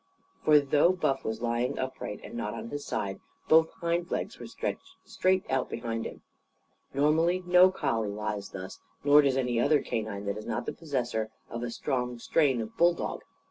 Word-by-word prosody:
For, 150 -1 +7
though 145 +5 +3
Buff 135 -7 0
was 110 +1 -3
lying 120 +3 0
upright 130 -5 -4
and - - -9
not 115 -3 -3
on - - -6
his 145 +2 -5
side, 95 -1 -3 0.3
both 160 0 +6
hind 170 +1 -1
legs - - -3
were - - -7
stretched - - -5
straight 185 0 +1
out 130 -1 0
behind 115 -1 -3
him. - - -11 0.7
Normally 160 +6 +2
no 180 +1 +7
collie 125 - -1
lies 105 0 -4
thus, 95 -1 -8 0.2
nor 145 +1 +7
does 135 -2 +2
any 125 -3 +1
other 145 +4 +3
canine 105 -2 -3
that 100 +1 -2
is 110 - -8
not - - -2
the - - -3
possessor 125 -8 -2 0.2
of 115 - -4
a 120 - -3
strong 125 +1 -2
strain 130 0 +2
of 110 0 -7
bulldog. 175 0 +2
130 Hz, 180 wpm, -29 LUFS, 115-155 Hz, 0.7 s, For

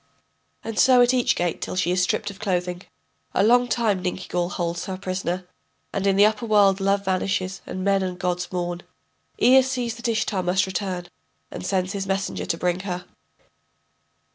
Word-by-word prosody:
[And 225 -1 -4
so 255 -1 +6
at 245 +1 +3
each 250 -2 +2
gate 175 -1 -1
till - - -4
she 175 -1 +1
is 180 0 +2
stripped 180 - 0
of 195 - -14
clothing. 180 -3 -2 0.5
A - - +4
long 245 +3 +5
time 220 -6 +1
Ninkigal 180 -1 -2
holds 170 -1 -2
her 190 -1 -4
prisoner, 185 -1 -3 0.5
and 195 0 0
in 195 - +3
the 200 +1 +6
upper 215 +2 0
world 200 -2 +4
love 200 +1 +1
vanishes 190 0 -1
and 185 - -4
men 195 0 +2
and 185 -1 -3
gods 180 0 -2
mourn. 175 -1 -3 0.6
Ea 265 +2 +7
sees 255 -3 -2
that 235 - -4
Ishtar 215 -4 0
must 180 +1 +1
return, 185 -1 -3 0.5
and - - -7
sends 185 +1 -1
his 195 -1 -3
messenger 195 0 -2
to 165 - -1
bring 180 +1 0
her. 180 -2 -5
190 Hz, 180 wpm, -24 LUFS, 180-205 Hz, 0.6 s, Ea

